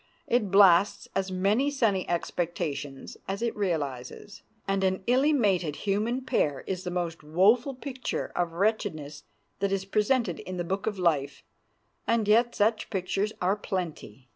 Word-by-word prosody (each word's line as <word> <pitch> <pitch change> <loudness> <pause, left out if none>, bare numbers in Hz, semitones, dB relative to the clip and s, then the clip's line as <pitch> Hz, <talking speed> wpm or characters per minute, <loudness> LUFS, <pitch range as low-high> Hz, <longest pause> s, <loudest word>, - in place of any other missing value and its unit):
It 230 -4 +1
blasts 195 0 +5
as 190 0 0
many 200 +9 +1
sunny 225 -10 0
expectations 165 -5 -3
as 195 +4 -3
it 235 - -1
realizes, 160 -1 -3 0.3
and 195 0 0
an 190 0 0
illy 265 +5 +3
mated 190 - +1
human 215 +6 0
pair 145 - 0
is 185 -1 -3
the 180 - -3
most 175 -2 -3
woeful 210 - +3
picture 260 -1 -4
of 175 -2 -1
wretchedness 170 -7 -1 0.3
that 200 0 0
is 195 -1 -1
presented 210 -1 +1
in 185 0 -6
the 175 - -1
book 190 +4 -3
of 210 -2 -1
life; 160 -6 0 0.6
and 230 -2 +2
yet 235 +3 +4
such 215 +2 +1
pictures 195 +1 -1
are 190 +3 +3
plenty. 165 - -5
195 Hz, 150 wpm, -28 LUFS, 170-215 Hz, 0.6 s, blasts